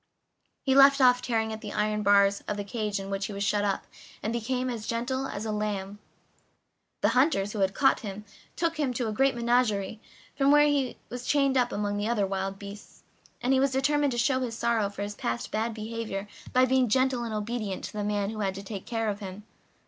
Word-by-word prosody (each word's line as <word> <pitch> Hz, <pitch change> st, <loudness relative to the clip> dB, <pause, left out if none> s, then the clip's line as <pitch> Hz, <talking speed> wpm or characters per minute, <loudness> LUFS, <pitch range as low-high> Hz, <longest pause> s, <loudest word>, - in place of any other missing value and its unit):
He 265 Hz, -, +2 dB
left 275 Hz, +1 st, +7 dB
off 250 Hz, -1 st, +5 dB
tearing 225 Hz, -2 st, -1 dB
at 220 Hz, -, -7 dB
the 210 Hz, -2 st, -6 dB
iron 210 Hz, 0 st, 0 dB
bars 200 Hz, 0 st, +4 dB
of 210 Hz, -, -2 dB
the 205 Hz, -, -3 dB
cage 210 Hz, -1 st, -2 dB
in 195 Hz, 0 st, -6 dB
which 195 Hz, 0 st, -2 dB
he 210 Hz, -, -7 dB
was 200 Hz, 0 st, -3 dB
shut 205 Hz, 0 st, +1 dB
up, 200 Hz, -1 st, -1 dB, 0.4 s
and 220 Hz, -, -1 dB
became 250 Hz, +2 st, -1 dB
as 230 Hz, -4 st, -4 dB
gentle 260 Hz, +3 st, -1 dB
as 210 Hz, -3 st, -5 dB
a 220 Hz, -, -2 dB
lamb. 205 Hz, -1 st, -3 dB, 1.0 s
The -, -, +4 dB
hunters 250 Hz, -7 st, +2 dB
who 215 Hz, -, -4 dB
had 190 Hz, 0 st, +1 dB
caught 270 Hz, -2 st, +4 dB
him 210 Hz, -1 st, -7 dB, 0.3 s
took 330 Hz, -1 st, -1 dB
him 265 Hz, -5 st, 0 dB
to 240 Hz, -1 st, -1 dB
a -, -, -1 dB
great 270 Hz, +4 st, +2 dB
menagerie, 235 Hz, -4 st, +1 dB, 0.4 s
where 290 Hz, +2 st, +6 dB
he 280 Hz, -4 st, +1 dB
was 245 Hz, 0 st, -6 dB
chained 275 Hz, -2 st, +3 dB
up 245 Hz, -2 st, +2 dB
among 205 Hz, 0 st, -1 dB
all -, -, -2 dB
the 210 Hz, +2 st, -1 dB
other 215 Hz, -4 st, +1 dB
wild 195 Hz, 0 st, -3 dB
beasts, 200 Hz, +1 st, -11 dB, 0.4 s
and 255 Hz, +2 st, +3 dB
he 265 Hz, -, +4 dB
determined 275 Hz, +2 st, +2 dB
to -, -, -3 dB
show 255 Hz, +2 st, +2 dB
his 235 Hz, -3 st, -3 dB
sorrow 230 Hz, -3 st, +1 dB
for 200 Hz, 0 st, -5 dB
his 205 Hz, 0 st, -4 dB
past 120 Hz, -10 st, -3 dB
bad 225 Hz, +2 st, -1 dB
behavior 220 Hz, -2 st, -5 dB, 0.2 s
by 255 Hz, 0 st, +5 dB
being 260 Hz, -1 st, +2 dB
gentle 260 Hz, +1 st, +2 dB
and 225 Hz, -2 st, -3 dB
obedient 210 Hz, -2 st, -3 dB
to -, -, -6 dB
the 210 Hz, -1 st, -3 dB
man 205 Hz, 0 st, -1 dB
who 220 Hz, -, -6 dB
had 195 Hz, -2 st, -1 dB
to 195 Hz, -, -7 dB
take 195 Hz, -1 st, -7 dB
care 225 Hz, -2 st, -1 dB
of 205 Hz, -1 st, -2 dB
him. 195 Hz, 0 st, -8 dB
220 Hz, 225 wpm, -28 LUFS, 205-255 Hz, 1.0 s, left